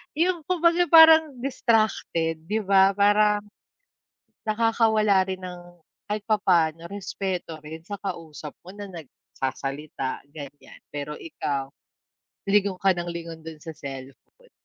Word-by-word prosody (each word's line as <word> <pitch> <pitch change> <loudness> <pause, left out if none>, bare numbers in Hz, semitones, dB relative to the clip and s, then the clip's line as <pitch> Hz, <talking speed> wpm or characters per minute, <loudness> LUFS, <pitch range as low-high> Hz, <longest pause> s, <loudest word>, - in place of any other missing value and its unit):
yung 340 +1 +1
kumbaga 345 -1 +3
parang 320 -2 +8
distracted 215 - 0
'di 215 +2 0
ba, 195 0 +5
parang, 205 0 +3 1.0
nakakawala 215 -3 +3
rin 190 -1 -4
ng 180 -1 -7 0.5
kahit 210 0 -3
papa'no 170 -6 +2
respeto 190 -4 -4
rin 160 +1 -8
sa 205 - -4
kausap 160 -5 -6
mo 185 - -10
na 205 -1 -7
nagsasalita 135 -2 -5
ganyan, 145 -2 -11
pero 145 +1 -5
ikaw, 140 -4 -4 0.8
lingon 200 -2 +2
ka 195 -1 +4
ng 175 0 -4
lingon 165 -1 -7
dun 160 -1 -9
sa 160 -2 -8
cellphone, 135 - -11
190 Hz, 120 wpm, -25 LUFS, 160-215 Hz, 1.0 s, parang